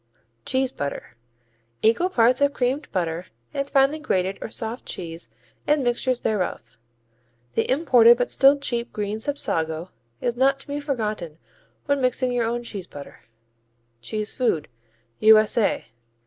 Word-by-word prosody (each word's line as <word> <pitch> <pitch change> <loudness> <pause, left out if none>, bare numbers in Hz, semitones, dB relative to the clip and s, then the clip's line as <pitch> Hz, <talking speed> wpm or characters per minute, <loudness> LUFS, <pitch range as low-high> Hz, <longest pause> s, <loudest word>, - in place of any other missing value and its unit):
Cheese 260 0 +1
butter 140 - -6 0.7
Equal 230 +12 +3
parts 250 -4 +3
of 285 0 +3
creamed 265 +4 -1
butter 175 -1 -2 0.3
and 280 0 -2
finely 275 +3 +3
grated 190 -10 -1
or - - -5
soft 225 +2 -5
cheese 165 -7 -6 0.4
and 295 -2 +3
mixtures 245 +1 0
thereof. 150 - -3 0.7
The - - 0
imported 250 -5 +6
but 245 - -1
still 275 +1 +5
cheap 240 -4 -3
green 210 +1 -3
Sapsago 165 - -2 0.3
is 240 - -1
not 270 +2 +3
to - - -12
be 285 0 -3
forgotten 215 - -3 0.5
when 285 -1 +1
mixing 255 0 +1
your 245 -2 0
own 240 +1 -2
cheese 200 -6 -6
butter. 145 -1 -12 0.8
Cheese 215 - -2
food 170 - 0 0.5
_U.S.A. 215 0 +4
235 Hz, 135 wpm, -24 LUFS, 195-270 Hz, 0.8 s, imported